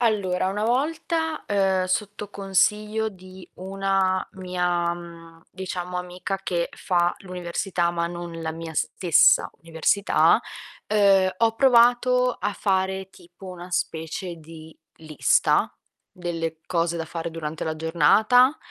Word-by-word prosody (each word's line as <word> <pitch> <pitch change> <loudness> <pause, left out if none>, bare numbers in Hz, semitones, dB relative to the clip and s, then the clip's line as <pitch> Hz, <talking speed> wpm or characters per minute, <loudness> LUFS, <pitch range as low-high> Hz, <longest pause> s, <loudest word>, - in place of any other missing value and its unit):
Allora 190 -5 +1
una 210 +2 -2
volta, 320 +5 -1
ehm, 190 -2 +1
sotto 205 +2 -3
consiglio 210 +3 0
di 185 -1 -14
una 190 0 0
mia, 180 -2 -1
mhmm, 165 -1 -11
diciamo 180 -1 -5
amica 180 +2 -4
che 170 -2 -1
fa 175 -1 +1
l'università 180 -1 -2
ma 170 0 -1
non 170 -1 -7
la 160 0 -3
mia 165 0 -8
stessa 170 +2 +3
università, 165 +5 +2 0.5
ehm, 195 -3 +4
ho 225 -1 +2
provato 250 0 +4
a 205 - -2
fare 190 -1 -1
tipo 175 +1 -16
una 180 0 -9
specie 170 +1 -3
di 160 0 -13 0.2
lista 155 -2 +1 0.4
delle 165 -2 -4
cose 170 -1 0
da 165 - -3
fare 165 +1 -5
durante 160 -1 -5
la 160 0 -2
giornata 215 - +4
185 Hz, 120 wpm, -24 LUFS, 170-200 Hz, 0.5 s, ehm